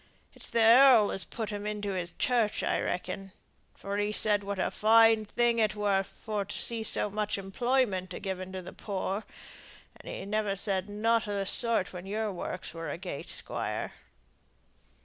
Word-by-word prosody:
It's -, -, -12 dB
the 230 Hz, -, +3 dB
earl 235 Hz, -2 st, +7 dB
as 195 Hz, -, 0 dB
put 220 Hz, -3 st, -5 dB
him 205 Hz, 0 st, -4 dB
into 210 Hz, -1 st, -3 dB
his 180 Hz, -2 st, -3 dB
church, 235 Hz, -4 st, +1 dB
I -, -, +1 dB
reckon, 195 Hz, +1 st, -4 dB, 0.4 s
for 200 Hz, +1 st, -4 dB
he 205 Hz, 0 st, 0 dB
said 210 Hz, -1 st, +1 dB
what 200 Hz, 0 st, -3 dB
a 185 Hz, -, 0 dB
fine 225 Hz, 0 st, +5 dB
thing 235 Hz, +2 st, +2 dB
it 215 Hz, -1 st, +2 dB
were 205 Hz, -2 st, +2 dB
for 210 Hz, +1 st, -4 dB
to 195 Hz, -, -7 dB
see 230 Hz, -1 st, -1 dB
so 220 Hz, -, +1 dB
much 210 Hz, 0 st, -1 dB
employment 195 Hz, -1 st, 0 dB
a -, -, -5 dB
given 185 Hz, -1 st, -4 dB
to 185 Hz, -1 st, -5 dB
the -, -, -9 dB
poor, 200 Hz, 0 st, -3 dB, 0.7 s
and -, -, -10 dB
he -, -, -6 dB
never 210 Hz, -1 st, 0 dB
said 195 Hz, 0 st, -2 dB
nought 225 Hz, +1 st, +1 dB
o' 200 Hz, -1 st, -1 dB
th' -, -, -7 dB
sort 230 Hz, -5 st, 0 dB
when 180 Hz, +1 st, -7 dB
your 215 Hz, +1 st, -1 dB
works 180 Hz, -1 st, -5 dB
were 165 Hz, 0 st, -5 dB
agait, 175 Hz, -5 st, -6 dB
Squire." -, -, -4 dB
205 Hz, 180 wpm, -30 LUFS, 195-220 Hz, 0.7 s, earl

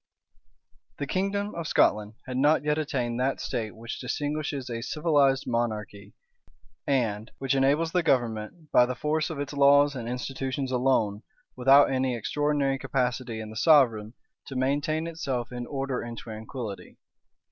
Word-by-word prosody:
The 145 Hz, -, -3 dB
kingdom 200 Hz, +5 st, -1 dB
of 170 Hz, -2 st, -4 dB
Scotland 105 Hz, +1 st, +2 dB
had 130 Hz, -, -5 dB
not 145 Hz, +4 st, +3 dB
yet 150 Hz, +1 st, +1 dB
attained 125 Hz, -6 st, -2 dB
that 135 Hz, +2 st, 0 dB
state 115 Hz, -4 st, -3 dB
which 115 Hz, +1 st, -7 dB
distinguishes 145 Hz, +1 st, -3 dB
a 115 Hz, -2 st, -4 dB
civilized 145 Hz, -2 st, +2 dB
monarchy, 105 Hz, -4 st, -3 dB, 0.7 s
and 115 Hz, -5 st, 0 dB
which 135 Hz, -1 st, -1 dB
enables 140 Hz, +5 st, +2 dB
the 180 Hz, -, +2 dB
government, 120 Hz, +2 st, -1 dB
by 125 Hz, -, +5 dB
the 125 Hz, -, -3 dB
force 155 Hz, +3 st, -1 dB
of 160 Hz, -3 st, -5 dB
its 145 Hz, 0 st, -4 dB
laws 145 Hz, 0 st, +5 dB
and 120 Hz, -2 st, -5 dB
institutions 130 Hz, +1 st, -3 dB
alone, 125 Hz, -5 st, +1 dB, 0.3 s
without 135 Hz, +3 st, +6 dB
any 130 Hz, -1 st, 0 dB
extraordinary 140 Hz, +3 st, 0 dB
capacity 125 Hz, -3 st, -2 dB
in 110 Hz, -1 st, -7 dB
the -, -, -10 dB
sovereign, 120 Hz, -5 st, +4 dB, 0.3 s
to 135 Hz, -, -7 dB
maintain 145 Hz, +5 st, 0 dB
itself 140 Hz, -8 st, -3 dB
in 120 Hz, -1 st, -5 dB
order 135 Hz, -2 st, -3 dB
and 120 Hz, 0 st, -7 dB
tranquillity. 110 Hz, -1 st, -7 dB
130 Hz, 145 wpm, -27 LUFS, 120-145 Hz, 0.7 s, without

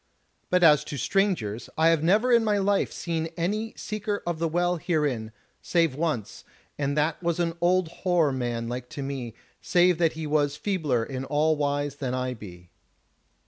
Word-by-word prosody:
But 180 Hz, 0 st, +3 dB
as 150 Hz, -3 st, +6 dB
to 145 Hz, -, -5 dB
strangers, 155 Hz, -, 0 dB
I 160 Hz, +1 st, +5 dB
have 165 Hz, -2 st, +3 dB
never 215 Hz, +9 st, +3 dB
in 235 Hz, -1 st, +5 dB
my 210 Hz, -2 st, +2 dB
life 200 Hz, 0 st, +1 dB
seen 165 Hz, -2 st, -3 dB
any 210 Hz, +6 st, -1 dB
Seeker 210 Hz, -1 st, -3 dB
of 170 Hz, -2 st, -2 dB
the 165 Hz, -, +1 dB
Well 175 Hz, +2 st, +1 dB
herein, 145 Hz, -10 st, -1 dB, 0.3 s
save 165 Hz, -5 st, +1 dB
once, 150 Hz, -8 st, -3 dB, 0.3 s
and 140 Hz, 0 st, -2 dB
that 150 Hz, +2 st, 0 dB
was 170 Hz, -1 st, -1 dB
an 170 Hz, -1 st, 0 dB
old 180 Hz, 0 st, +3 dB
hoar 175 Hz, -6 st, +3 dB
man 120 Hz, -3 st, -2 dB
like 125 Hz, +1 st, -5 dB
to 140 Hz, -, -3 dB
me, 130 Hz, -5 st, -5 dB, 0.3 s
save 180 Hz, -1 st, +3 dB
that 165 Hz, -2 st, +3 dB
he 160 Hz, 0 st, -5 dB
was 145 Hz, -1 st, +1 dB
feebler 150 Hz, -, 0 dB
in 130 Hz, 0 st, -5 dB
all 150 Hz, +3 st, +2 dB
wise 145 Hz, -1 st, -1 dB
than 130 Hz, -3 st, -2 dB
I 130 Hz, 0 st, -2 dB
be." 90 Hz, -6 st, -12 dB
155 Hz, 180 wpm, -26 LUFS, 135-175 Hz, 0.3 s, as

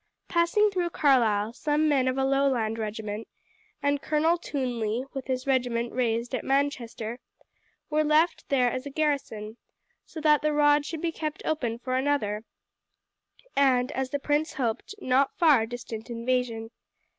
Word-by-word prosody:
Passing 355 Hz, +5 st, +3 dB
through 360 Hz, -3 st, -1 dB
Carlisle, 230 Hz, -9 st, +2 dB
some 300 Hz, +4 st, +1 dB
men 270 Hz, -4 st, +2 dB
of 255 Hz, +1 st, 0 dB
a 265 Hz, -, +2 dB
Lowland 265 Hz, -5 st, +1 dB
regiment, 215 Hz, 0 st, -4 dB, 0.6 s
and 285 Hz, 0 st, +1 dB
Colonel 320 Hz, +3 st, +2 dB
Twonley 245 Hz, -6 st, -2 dB
with 270 Hz, -2 st, -6 dB
his 255 Hz, -1 st, -2 dB
regiment 245 Hz, -3 st, 0 dB
raised 235 Hz, 0 st, -1 dB
at 255 Hz, -, -2 dB
Manchester, 250 Hz, -4 st, -1 dB, 0.7 s
were 305 Hz, 0 st, +1 dB
left 310 Hz, +3 st, +2 dB
there 250 Hz, -3 st, +3 dB
as 255 Hz, +3 st, -4 dB
a -, -, -4 dB
garrison, 275 Hz, -8 st, -2 dB, 0.5 s
so 320 Hz, -, -9 dB
that 300 Hz, -1 st, +4 dB
the 305 Hz, 0 st, +1 dB
road 290 Hz, 0 st, +4 dB
should 325 Hz, -2 st, -5 dB
be 335 Hz, -, +1 dB
kept 310 Hz, -1 st, -5 dB
open 245 Hz, -8 st, -1 dB
for 255 Hz, +1 st, -2 dB
another 260 Hz, -7 st, 0 dB, 1.1 s
and, 260 Hz, -2 st, +3 dB
as 265 Hz, 0 st, -2 dB
the 285 Hz, -, -1 dB
prince 295 Hz, +3 st, 0 dB
hoped, 245 Hz, -, -3 dB
not 270 Hz, -4 st, +1 dB
far 285 Hz, -10 st, +5 dB
distant 235 Hz, -1 st, -7 dB
invasion. 235 Hz, -1 st, -2 dB
265 Hz, 150 wpm, -27 LUFS, 235-295 Hz, 1.1 s, far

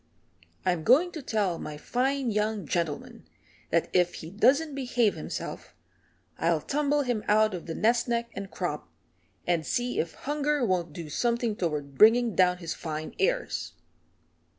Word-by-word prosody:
I'm 175 Hz, -3 st, +1 dB
going 295 Hz, -, +5 dB
to 315 Hz, -, -6 dB
tell 210 Hz, -9 st, -1 dB
my 150 Hz, -, -6 dB
fine 260 Hz, -, 0 dB
young 210 Hz, -2 st, -1 dB
gentleman 165 Hz, -1 st, -3 dB, 0.4 s
that -, -, +2 dB
if 180 Hz, -1 st, +3 dB
he 160 Hz, -, -8 dB
doesn't 275 Hz, +9 st, +3 dB
behave 245 Hz, -5 st, +1 dB
himself -, -, -6 dB, 0.6 s
I'll -, -, +2 dB
tumble 290 Hz, 0 st, +1 dB
him 240 Hz, -5 st, -1 dB
out 215 Hz, 0 st, +4 dB
of 175 Hz, -2 st, -6 dB
the 165 Hz, -, -4 dB
nest 235 Hz, +2 st, +2 dB
neck 235 Hz, 0 st, -1 dB
and 195 Hz, -1 st, -6 dB
crop, 150 Hz, -, -4 dB, 0.6 s
and 170 Hz, -2 st, +1 dB
see 245 Hz, +9 st, -1 dB
if 160 Hz, -, -2 dB
hunger 295 Hz, -1 st, 0 dB
won't 180 Hz, -5 st, 0 dB
do 165 Hz, +1 st, -7 dB
something 235 Hz, +7 st, 0 dB
toward 150 Hz, -7 st, -3 dB
bringing 230 Hz, +1 st, +6 dB
down 180 Hz, 0 st, +3 dB
his 170 Hz, -2 st, -4 dB
fine 155 Hz, -1 st, -5 dB
airs." -, -, 0 dB
215 Hz, 150 wpm, -28 LUFS, 170-245 Hz, 0.6 s, bringing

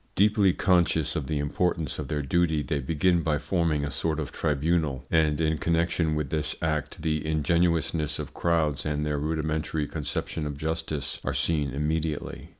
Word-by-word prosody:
Deeply 105 Hz, -1 st, +4 dB
conscious 85 Hz, -4 st, +2 dB
of 75 Hz, -5 st, -2 dB
the 75 Hz, -, -1 dB
importance 80 Hz, +1 st, -1 dB
of -, -, -4 dB
their 75 Hz, -1 st, -2 dB
duty, 80 Hz, +1 st, +1 dB
they 70 Hz, +2 st, -1 dB
begin 85 Hz, +5 st, +2 dB
by 80 Hz, -2 st, +1 dB
forming 80 Hz, -2 st, 0 dB
a 70 Hz, -, -2 dB
sort 80 Hz, +2 st, -1 dB
of 75 Hz, -, -4 dB
tribunal, 75 Hz, -3 st, 0 dB
and 80 Hz, -2 st, +3 dB
in 80 Hz, -1 st, +1 dB
connection 85 Hz, -1 st, +1 dB
with 75 Hz, -3 st, -2 dB
this 75 Hz, 0 st, 0 dB
act 80 Hz, -1 st, -2 dB
the 75 Hz, -2 st, 0 dB
ingenuousness 80 Hz, 0 st, +1 dB
of -, -, -6 dB
crowds 80 Hz, -4 st, +1 dB
and 75 Hz, 0 st, -1 dB
their 75 Hz, -1 st, -1 dB
rudimentary 80 Hz, 0 st, -1 dB
conception 75 Hz, +1 st, -3 dB
of 70 Hz, -1 st, -5 dB
justice 80 Hz, -1 st, -3 dB
are 65 Hz, -, -2 dB
seen 70 Hz, +1 st, +2 dB
immediately. 75 Hz, +2 st, -2 dB
80 Hz, 165 wpm, -27 LUFS, 75-85 Hz, -, Deeply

